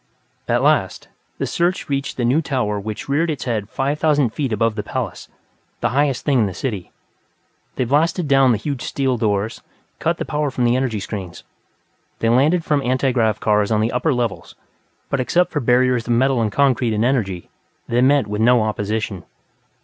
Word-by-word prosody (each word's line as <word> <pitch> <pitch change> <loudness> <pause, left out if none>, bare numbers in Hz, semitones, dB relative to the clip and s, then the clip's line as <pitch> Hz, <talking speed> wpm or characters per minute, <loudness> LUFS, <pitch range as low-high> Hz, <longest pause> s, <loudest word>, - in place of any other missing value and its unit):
At - - +1
last, - - +1 0.3
the - - -2
search 175 +2 -1
reached 140 0 -3
the 120 - 0
New 130 +7 +3
Tower 125 -9 -1
which 105 +1 -6
reared 150 +5 +1
its 150 - -3
head 110 -4 -2
five 140 +5 -2
thousand 145 -6 +2
feet 135 -5 -2
above 115 +1 +1
the 105 - -3
palace, - - -5 0.5
the - - 0
highest 140 -1 0
thing 140 -4 +3
in 110 - +3
the 95 - -6
city. 105 -6 -4 0.9
They - - 0
blasted 160 +6 +1
down 135 -2 +5
the 115 - +2
huge 135 +3 -4
steel 135 -2 -1
doors, 110 -1 -1 0.4
cut - - 0
the - - -4
power 150 -1 -1
from 130 -2 -2
the 120 0 +3
energy 130 -5 -1
screens. 95 -5 -7 0.7
They 115 - 0
landed 150 +8 +3
from 145 -2 +1
antigrav 125 -4 +1
cars 105 -1 +2
on 110 -1 +2
the 110 +2 +1
upper 140 +6 0
levels. 120 -5 -3 0.6
But 140 - 0
except 175 +8 +1
for 150 - -1
barriers 125 -1 +2
of 120 - +2
metal 130 +1 +2
and 110 -2 0
concrete 125 -3 +2
and 110 +2 +1
energy, 100 -9 -1 0.4
they 120 +1 +1
met 135 -1 +4
with 105 +1 -3
no 120 0 +4
opposition. 105 -2 -3
125 Hz, 190 wpm, -20 LUFS, 110-140 Hz, 0.9 s, down